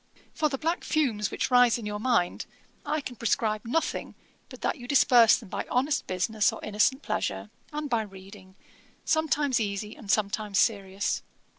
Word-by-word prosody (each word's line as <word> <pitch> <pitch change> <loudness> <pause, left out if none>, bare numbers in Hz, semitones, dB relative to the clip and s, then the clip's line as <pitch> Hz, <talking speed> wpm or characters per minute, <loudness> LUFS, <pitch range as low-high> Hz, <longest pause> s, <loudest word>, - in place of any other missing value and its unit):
'For 305 -1 +1
the 275 - -3
black 330 +5 -1
fumes 240 -10 0
which - - -2
rise 245 -2 +5
in 230 - -7
your 210 0 -4
mind, 225 -7 0 0.4
I 305 0 -1
can 255 -3 -7
prescribe 215 -1 0
nothing 320 +8 -2 0.3
but - - -12
that 310 - -1
you 245 - -9
disperse 245 -4 +6
them 225 - -11
by - - -4
honest 280 +4 0
business 200 +3 +1
or - - -8
innocent 215 +7 +1
pleasure, - - -3 0.2
and 300 0 -4
by 235 -4 +1
reading, 190 -1 -12 0.5
sometimes 295 -4 +1
easy 210 0 -3
and 205 - -13
sometimes 210 0 0
serious. 200 -3 +1
225 Hz, 165 wpm, -27 LUFS, 205-270 Hz, 0.5 s, disperse